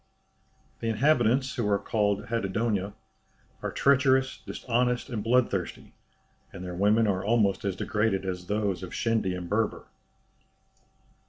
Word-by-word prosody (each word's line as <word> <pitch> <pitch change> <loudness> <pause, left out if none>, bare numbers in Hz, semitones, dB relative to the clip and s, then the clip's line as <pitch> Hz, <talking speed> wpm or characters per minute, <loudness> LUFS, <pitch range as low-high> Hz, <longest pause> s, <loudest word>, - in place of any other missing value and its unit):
The 115 - -3
inhabitants, 130 +1 +2
who 110 -4 0
are 100 - +3
called 105 -1 0
Hadendoa, 105 -2 -1 0.7
are - - -3
treacherous, 130 -1 +3
dishonest, 125 0 -1
and 110 -4 -3
bloodthirsty; 115 -6 0 0.6
and 90 - -8
their 90 - -5
women 105 +5 +3
are 95 -3 0
almost 105 -2 +2
as 95 -2 -1
degraded 105 -1 0
as 90 -1 -4
those 100 -3 -1
of 90 - -7
Shendy 110 -5 0
and 90 -1 -6
Berber. 105 +3 -1
105 Hz, 130 wpm, -27 LUFS, 95-120 Hz, 0.7 s, are